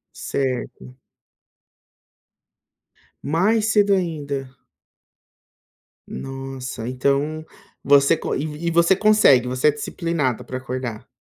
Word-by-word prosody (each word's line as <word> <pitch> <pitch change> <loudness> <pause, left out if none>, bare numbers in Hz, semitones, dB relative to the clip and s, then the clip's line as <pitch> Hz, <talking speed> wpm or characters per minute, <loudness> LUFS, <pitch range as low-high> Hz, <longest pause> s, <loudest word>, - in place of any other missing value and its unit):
Certo. 125 - -4 2.3
Mais 195 +9 +2
cedo 205 -1 +4
ainda. 145 -7 -3 1.6
Nossa, 135 -3 -6
então, 140 +4 -1 0.4
você 140 +3 +5
con - - -3
e 155 +3 -4
e 170 - +1
você 170 +3 +4
consegue, 200 - +4
você 130 +3 +1
é 150 - +6
disciplinada 150 - -2
pra 130 - -6
acordar? 130 -3 -6
140 Hz, 90 wpm, -22 LUFS, 130-165 Hz, 2.3 s, é